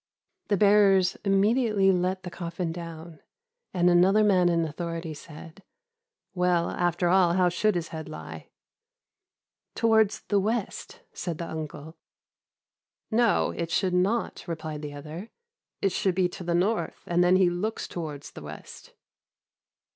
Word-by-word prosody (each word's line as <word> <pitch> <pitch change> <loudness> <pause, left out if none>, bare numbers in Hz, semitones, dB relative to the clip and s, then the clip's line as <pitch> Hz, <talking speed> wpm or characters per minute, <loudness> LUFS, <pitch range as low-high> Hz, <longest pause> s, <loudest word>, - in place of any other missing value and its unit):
"The 205 - +1
bearers 200 -2 +4
immediately 205 0 +3
let 185 +1 -1
the 180 - -7
coffin 170 -1 -4
down, 165 -1 -8 0.5
and 180 -1 +2
another 185 +4 +5
man 185 -4 +4
in 170 -1 +1
authority 165 +1 -5
said, 160 +4 -12 0.7
'Well, 180 -2 +1
after 175 0 0
all, 180 -1 +4
how 180 0 +3
should 205 +4 +1
his 170 -2 -3
head 160 -1 -7
lie?' 80 0 -9 1.3
"'Towards 220 -2 +3
the 205 - +1
west,' 215 +1 -3
said 170 -3 -4
the 170 - -5
uncle. 155 0 -7 1.1
"'No, 230 0 +2
it 170 -1 -4
should 185 +2 0
not,' 195 +6 0
replied 155 -2 -5
the 145 -1 -7
other; 155 +9 -8 0.5
'it 195 - +3
should 190 -1 0
be 185 -1 +3
to 180 - -9
the 170 0 0
north, 200 +6 -1
and 175 +1 +2
then 180 +1 +4
he 185 -2 +4
looks 210 +6 -3
towards 150 -4 -6
the - - -11
west. - - -11
180 Hz, 140 wpm, -27 LUFS, 165-195 Hz, 1.3 s, another